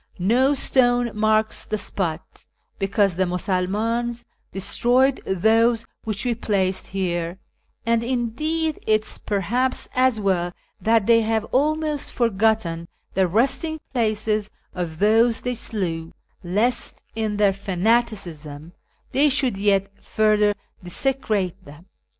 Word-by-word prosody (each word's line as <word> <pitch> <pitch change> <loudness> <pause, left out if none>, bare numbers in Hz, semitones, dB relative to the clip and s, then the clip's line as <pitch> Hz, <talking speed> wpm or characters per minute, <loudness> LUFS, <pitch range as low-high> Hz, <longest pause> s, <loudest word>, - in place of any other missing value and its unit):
No 250 +10 +3
stone 245 -3 +2
marks 215 0 +1
the 215 - -2
spot, 175 -5 -4 0.3
because 195 0 +2
the 185 - +2
Musulmtins 215 +7 -1 0.3
destroyed 245 +7 +2
those 225 +4 +3 0.2
which 215 +1 -3
we 245 - +1
placed 195 -4 -1
here, 175 -2 -2 0.5
and, 230 0 +2
indeed, 300 +7 -1
it 215 0 +3
is - - -6
perhaps 240 +6 -1
as 255 -3 +2
well 180 -3 0 0.3
that 225 -2 +3
they 230 0 +5
have 220 -1 0
almost 300 +1 0
forgotten 215 -7 0 0.3
the 190 -1 +2
resting 270 - 0
places 215 -3 0 0.2
of 170 -3 -4
those 225 +4 +3
they 250 - -2
slew, 175 -8 -3 0.3
lest, 215 +8 -1
in 215 -2 -2
their 205 -2 +3
fanaticism, 180 -6 -2 0.4
they 290 +3 +4
should 260 -5 +2
yet 195 0 0
further 210 -1 +2 0.3
desecrate 195 -3 -1
them. 150 +3 -14
215 Hz, 115 wpm, -23 LUFS, 190-240 Hz, 0.5 s, they